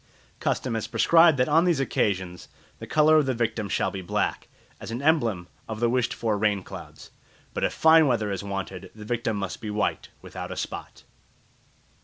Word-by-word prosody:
Custom 125 - -1
has 110 -1 -2
prescribed 165 -3 +5
that 125 - +2
on 160 +3 +4
these 170 -5 +2
occasions 95 -8 -1 0.3
the - - -8
colour 155 +1 +5
of 150 -3 +2
the 130 - 0
victim 110 -3 -2
shall - - 0
be 95 - -5
black, 85 - -2 0.3
as - - -8
an 115 +2 -4
emblem 120 - +1 0.2
of 110 -1 -5
the 120 0 +2
wished 125 -1 +1
for 110 -3 -1
rain 100 -2 +1
clouds. - - -11 0.4
But - - -3
if - - +2
fine 160 -1 +5
weather 110 -5 0
is 100 0 -4
wanted, 95 -2 -5
the 105 -1 -10
victim 115 -1 -1
must 95 -2 -5
be 110 - -5
white, 105 0 -2
without - - -8
a - - -6
spot. - - -6
115 Hz, 190 wpm, -25 LUFS, 100-135 Hz, 0.4 s, prescribed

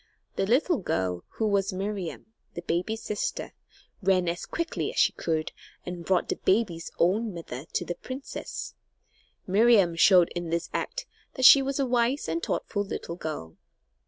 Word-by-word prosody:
The 195 - 0
little 280 - +3
girl 90 - -1
who 220 - -1
was 200 -1 +1
Miriam, 195 +1 -5 0.2
the 170 - -5
baby's 180 +7 -2
sister 210 - -3 0.5
ran 185 -2 +2
as 170 +1 -3
quickly 335 0 -2
as - - -12
she - - +4
could 160 -2 -2 0.3
and 180 -1 -6
brought 185 +1 +1
the - - -2
baby's 185 -5 0
own 205 +4 +1
mother 145 -5 -7
to - - -1
the 175 - -2
princess. 260 +9 -7 0.7
Miriam 200 -3 +4
showed 180 0 +6
in 175 -1 -5
this 170 +1 -2
act - - -3 0.3
that 260 - +1
she 275 - +10
was 270 0 -2
a 275 - +2
wise 245 +2 +1
and 165 +1 -1
thoughtful 205 - -2
little 170 -3 -5
girl. 150 - -6
190 Hz, 160 wpm, -27 LUFS, 170-230 Hz, 0.7 s, she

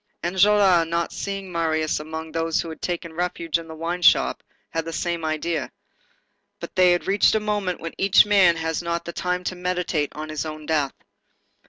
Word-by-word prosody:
Enjolras, 190 -1 +4
not 170 0 -1
seeing 195 -2 -5
Marius 160 -2 0
among 160 +1 -6
those 165 0 0
who 165 - -3
had 160 - -9
taken 170 -2 -4
refuge 170 -1 -1
in 165 - -10
the 160 - -9
wine 170 +3 -3
shop, - - +4 0.3
had 165 - -1
the 165 - -6
same 170 0 -2
idea. 155 -2 -2 0.9
But - - -8
they 180 -1 +5
had 175 - -1
reached 200 +2 +3
a - - +3
moment 205 -4 -2
when 165 - -6
each 195 +1 +6
man 195 -5 +5
has 160 0 -2
not 170 0 -3
the 170 - -6
time 180 +1 -2
to 185 - -3
meditate 180 -4 -1
on 155 +1 -6
his 155 -1 -3
own 155 -1 -7
death. 150 -3 0
170 Hz, 190 wpm, -23 LUFS, 160-180 Hz, 0.9 s, each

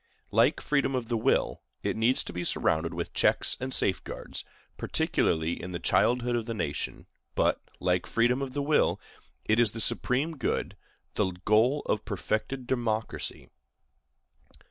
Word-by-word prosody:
Like - - +3
freedom 140 -2 +1
of 125 -2 -3
the 120 - +1
will, 110 - +1 0.2
it - - 0
needs 115 +4 +3
to - - -8
be 90 - -3
surrounded 85 -1 +1
with 85 0 -4
checks - - +2
and 130 +1 -4
safeguards, 95 -7 -2 0.3
particularly 80 +1 0
in 90 +1 -6
the 85 - -3
childhood 120 +6 +2
of 115 -1 -2
the 115 - -3
nation; 75 -8 -3 0.3
but, - - +2 0.2
like 90 -1 +1
freedom 120 +3 +2
of 135 -2 -4
the 145 - -1
will, 150 +1 +2 0.5
it 110 +2 +3
is 120 -2 +5
the 115 - -5
supreme 140 +8 +1
good, - - -1 0.4
the 95 -3 0
goal 120 +8 +4
of 105 - 0
perfected 110 +5 -2
democracy. 115 -3 -2
115 Hz, 150 wpm, -28 LUFS, 95-130 Hz, 0.5 s, is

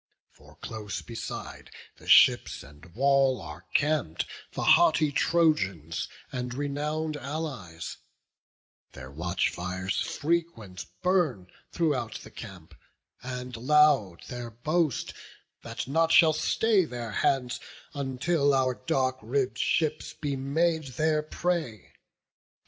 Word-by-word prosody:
For - - -19
close 105 -2 -6
beside 115 -1 -7 0.3
the - - -16
ships - - +5
and 75 +4 -15
wall 135 0 +3
are 75 +2 -10
camp'd 155 +1 +1 0.3
The - - -3
haughty 165 - +5
Trojans 100 - +1 0.2
and 125 -1 -4
renown'd 150 +2 -2
allies: 135 - -5 1.0
Their 65 0 -10
watch 85 +5 -1
fires 90 +2 -3
frequent 145 - -2 0.2
burn 160 - +1 0.2
throughout 130 -9 -1
the - - -12
camp; 95 -7 -10 0.5
And 125 -1 -6
loud 135 - +3
their 120 -1 -6
boast 150 +5 -1 0.5
that - - -6
nought 165 +4 +2
shall 160 -2 +7
stay 210 +5 +2
their 120 -7 -5
hands, 125 +2 0 0.3
Until 140 +2 +1
our 130 -1 +2
dark 130 -3 -1
ribb'd 130 +4 -1
ships 155 -1 0
be 145 -3 -3
made 160 +4 0
their 155 0 +2
prey. 155 - -3
135 Hz, 110 wpm, -28 LUFS, 110-155 Hz, 1.0 s, shall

